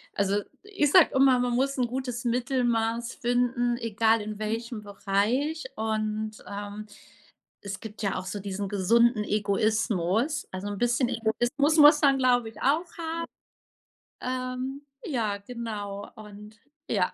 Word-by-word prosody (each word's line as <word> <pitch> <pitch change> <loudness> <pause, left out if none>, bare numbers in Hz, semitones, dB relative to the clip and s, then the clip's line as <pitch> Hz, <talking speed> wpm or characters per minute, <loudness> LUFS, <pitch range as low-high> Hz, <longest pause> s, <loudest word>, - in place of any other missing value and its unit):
also, 200 +1 +1 0.2
ich 390 -9 0
sage 360 -2 +7
immer: 265 -1 +5
„Man 245 0 0
muss 275 +2 0
'n 250 -2 +1
gutes 250 0 -4
Mittelmaß 240 -2 0
finden, 245 0 +1
egal 225 -1 +2
in 210 0 -6
welchem 225 +1 -3
Bereich.“ 215 +10 0
Und, 215 0 -2
ähm, 205 +1 -6 0.8
es 200 0 -6
gibt 215 -1 -9
ja 200 -2 -1
auch 185 - -5
so 185 +2 -4
diesen 200 0 -4
gesunden 215 +3 +3
Egoismus. 215 - 0
Also, 185 +2 -5
'n 205 - -4
bisschen 240 +2 +1
Egoismus 245 +6 +1
muss 295 0 +8
man, 275 -2 +5
glaube 250 -3 +3
ich 225 - -14
auch 300 +6 +2
ha 335 0 -3 1.0
ähm, 255 +2 -4 0.2
ja, 225 -8 -1
genau 205 -2 -6
und 210 0 -12 0.3
ja. 190 -5 +1
230 Hz, 135 wpm, -27 LUFS, 210-255 Hz, 1.0 s, muss